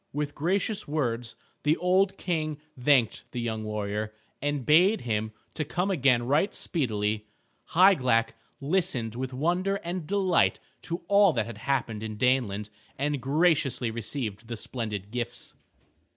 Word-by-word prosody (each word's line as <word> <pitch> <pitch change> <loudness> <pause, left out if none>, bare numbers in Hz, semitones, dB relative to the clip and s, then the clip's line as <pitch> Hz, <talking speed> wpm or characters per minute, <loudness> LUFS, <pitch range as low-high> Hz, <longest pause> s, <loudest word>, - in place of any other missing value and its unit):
With 145 0 -2
gracious 190 +6 -1
words 120 -6 -2 0.3
the 150 +2 +2
old 190 +2 +2
King 155 -4 -2 0.2
thanked 125 -2 +3
the 125 - -3
young 110 -2 -2
warrior, 105 0 -3 0.3
and 145 -2 -1
bade 180 +8 +5
him 110 -2 -1 0.2
to 155 - -2
come 180 +6 -1
again 130 -8 +3
right 145 - +2
speedily. 105 - -1 0.5
Hygelac 130 -13 +5 0.3
listened 135 - 0
with 130 +2 -4
wonder 175 +9 0
and 175 -2 -4
delight 190 -3 +3 0.2
to 170 +1 -5
all 200 -3 +5
that 115 -5 0
had 115 - -8
happened 120 -6 -1
in 110 -1 -5
Daneland 110 -4 +1 0.3
and 145 0 -1
graciously 140 -4 +2
received 115 -1 -4
the 115 0 -4
splendid 105 -4 -4
gifts. 120 -1 -4
135 Hz, 135 wpm, -28 LUFS, 115-170 Hz, 0.5 s, bade